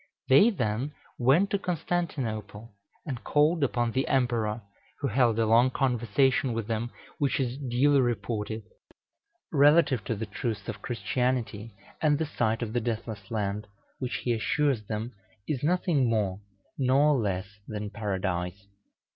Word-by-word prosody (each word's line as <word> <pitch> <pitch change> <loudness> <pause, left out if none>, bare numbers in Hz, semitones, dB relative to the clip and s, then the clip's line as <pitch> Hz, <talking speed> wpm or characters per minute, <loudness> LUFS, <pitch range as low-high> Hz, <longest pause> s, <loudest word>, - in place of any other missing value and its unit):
They 140 - +7
then 130 - -2 0.3
went 140 +11 +4
to 200 - +1
Constantinople, 125 - -3 0.3
and 130 -7 -5
called 150 +2 +3
upon 120 -3 +1
the 130 +3 0
Emperor, 120 -4 0 0.4
who 140 - -1
held 120 -1 +3
a 115 - +3
long 115 +3 +5
conversation 130 0 +1
with 115 -1 -2
them, 115 +1 -2 0.3
which 140 -2 +1
is 125 -2 -1
duly 135 +2 +3
reported, 110 -2 -2 0.9
relative 145 -5 +5
to 115 - -1
the 110 +2 -4
truths 105 0 -4
of 110 -3 -5
Christianity 120 -3 -2 0.3
and 150 -2 +3
the 160 - -1
site 115 -6 0
of 110 -1 -5
the 120 - +1
Deathless 110 -3 -4
Land, 105 -1 -2 0.3
which, 125 -2 -3
he 120 - +1
assures 135 +2 +1
them, 110 +2 -3 0.4
is 140 -5 -1
nothing 155 -5 +2
more 100 -4 0 0.4
nor 140 +3 +4
less 100 -3 -2
than 105 -1 -5
Paradise. 95 -3 -3
120 Hz, 140 wpm, -28 LUFS, 110-140 Hz, 0.9 s, They